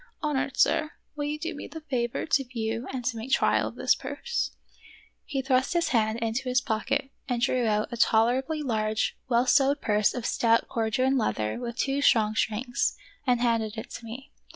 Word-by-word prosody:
" - - -35
Honored 280 -2 -1
sir, 310 0 +2 0.2
will 290 -1 -2
you 300 +1 -2
do 330 +3 -4
me 290 - -7
the 320 +2 -9
favor 250 -6 -2
to 285 -3 +2
view 230 -1 -3
and 255 -2 -5
to 245 -2 -1
make 225 +4 -6
trial 265 - +3
of - - -8
this - - +3
purse 480 0 -3 0.4
" - - -20 0.3
He 270 -3 -2
thrust 260 +2 +2
his 340 -1 +1
hand 220 -2 +2
into 230 +3 -2
his 250 0 +3
pocket 225 +3 -1 0.2
and 245 -1 0
drew 250 -1 +1
out 210 0 +1
a - - -4
tolerably 255 +8 +2
large, 220 -4 0
well 240 0 +3
sewed 280 +2 +4
purse 210 -2 +2
of 245 -2 -4
stout 230 -1 +2
Corduan 255 +4 +1
leather 110 - -1
with 235 -1 -5
two 275 +1 0
strong 220 -6 +4
strings, 230 +3 0 0.3
and 245 -1 +3
handed 230 -2 0
it 220 - -7
to - - -8
me. 250 +5 -9
245 Hz, 200 wpm, -27 LUFS, 225-275 Hz, 0.4 s, sewed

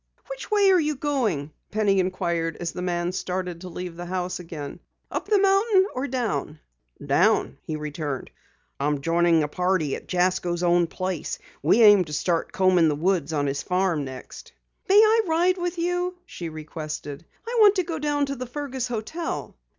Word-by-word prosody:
"Which - - -7
way 405 -2 +4
are 370 - +5
you 305 -2 0
going?" 235 - -1 0.2
Penny 205 -2 +2
inquired 170 -3 -1
as 170 -1 -3
the 180 - -6
man 175 -1 -1
started 180 -2 -4
to 185 - -7
leave 180 0 -6
the 175 +1 -7
house 180 0 -3
again. 160 -5 -7 0.3
"Up - - -3
the 415 0 +4
mountain 390 0 +4
or 260 +3 -2
down?" 210 - -2 0.5
"Down," - - +2
he 155 - -5
returned. 150 -3 -4 0.5
"I'm 145 0 0
joining 165 0 +3
a - - -1
party 180 -2 0
at - - -10
Jasko's 180 -1 +1
own 175 -1 +3
place. 185 -1 -3 0.2
We 190 - +4
aim 205 -3 +8
to 150 - -8
start 165 +2 0
combing 185 -3 +4
the 150 - +1
woods 170 -1 0
on 145 -2 0
his 140 0 -1
farm 180 -4 0
next." 130 -1 -9 0.4
"May 395 - +6
I 440 +1 +6
ride 350 +3 +2
with 350 0 -2
you?" 355 +1 -1
she 170 -2 -7
requested. 155 -1 -7 0.2
"I 480 - -3
want 415 -1 +7
to 370 - +1
go 330 -2 -4
down 290 -1 +1
to 275 0 -4
the 255 -1 -6
Fergus 265 -1 -4
hotel." 245 +9 -4
185 Hz, 180 wpm, -25 LUFS, -, 0.5 s, aim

